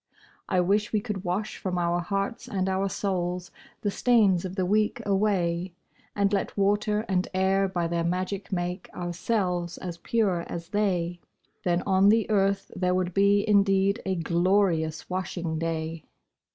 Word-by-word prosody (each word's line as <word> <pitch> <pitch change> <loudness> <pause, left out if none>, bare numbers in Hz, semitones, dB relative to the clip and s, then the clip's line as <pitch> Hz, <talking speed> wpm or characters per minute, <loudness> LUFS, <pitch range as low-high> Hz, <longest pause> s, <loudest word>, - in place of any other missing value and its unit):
I 185 - +3
wish 205 +4 +1
we 215 - +2
could 205 -3 -4
wash 200 +4 -2
from 185 -2 -3
our 175 0 +1
hearts 200 +6 -3
and 190 -1 -1
our 190 +1 0
souls 180 -2 -2 0.3
The 205 - 0
stains 205 -7 +3
of 185 0 -5
the 185 -2 0
week 210 +4 +1
away, 190 -3 +1 0.4
And 200 0 +1
let 200 - -1
water 205 +1 +2
and 185 -1 0
air 190 +1 +2
by 175 -2 -1
their 170 0 -1
magic 185 +4 -2
make 180 0 -3
Ourselves 175 -1 -1
as 175 -2 -6
pure 200 -6 +1
as 170 0 -6
they; 180 -4 0 0.4
Then 175 -2 +1
on 195 0 +4
the 220 0 +3
earth 195 -1 +1
there 180 0 +1
would 185 -1 -1
be 200 +2 +3
indeed 200 +1 +3
A 190 -1 -1
glorious 170 -2 +1
washing 175 -3 -3
day! 160 -1 -3
190 Hz, 155 wpm, -27 LUFS, 175-200 Hz, 0.4 s, on